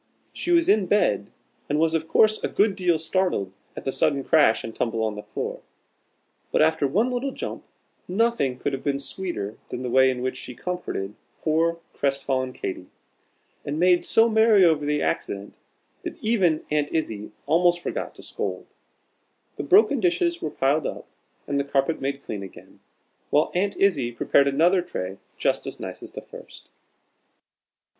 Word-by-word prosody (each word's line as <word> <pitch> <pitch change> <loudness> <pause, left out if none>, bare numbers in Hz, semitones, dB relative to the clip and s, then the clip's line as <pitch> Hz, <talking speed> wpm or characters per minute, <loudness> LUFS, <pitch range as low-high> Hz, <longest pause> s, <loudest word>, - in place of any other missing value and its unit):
She - - -4
was 340 -1 +4
in 205 -3 +4
bed, 105 - +2 0.4
and 145 - +1
was 160 +1 +2
of 160 0 -1
course 215 +5 +3
a - - +2
good 205 -1 +2
deal 180 -3 +2
startled 160 - -1 0.2
at - - -8
the 135 - 0
sudden 140 +1 +1
crash 145 -6 +4
and 115 - -7
tumble 115 -1 -1
on 110 -1 -1
her 105 - -6
floor. - - -5 0.9
But - - +4
after 155 -2 +2
one 215 - +1
little 250 +2 -1
jump, - - -6 0.4
nothing 190 - +1
could 140 - -2
have 135 - -4
been 140 -1 0
sweeter 140 - -4
than 125 - -5
the 125 - -3
way 130 +1 +5
in 125 -1 -2
which 130 - -2
she 125 - -8
comforted 175 - -4 0.3
poor 165 +2 +2 0.2
crest 140 -1 -1
fallen 130 -1 -1
Katy, 95 -6 -5 0.8
and 145 +2 -3
made 180 0 +4
so 225 +1 +4
merry 220 -3 +5
over 150 -3 +2
the 150 0 +1
accident, 100 +1 -3 0.4
that - - -6
even 190 -8 +1
Aunt 150 -1 +1
Izzie 110 -11 -3
almost 175 +3 +3
forgot - - -4
to - - -13
scold. - - -4 0.9
The - - -2
broken 370 - +5
dishes 340 - +1
were - - -2
piled 140 +2 +1
up - - -6 0.4
and 140 - -1
the - - +1
carpet 140 +3 0
made 140 +1 -3
clean 105 -2 -5
again, 95 - -12 0.5
while 150 - +2
Aunt 195 +3 0
Izzie 145 -12 +2
prepared 140 +4 +3
another 170 +7 +3
tray 95 - -5 0.2
just - - 0
as - - -6
nice - - -7
as - - -10
the - - -6
first. - - -13
155 Hz, 175 wpm, -24 LUFS, 130-185 Hz, 0.9 s, way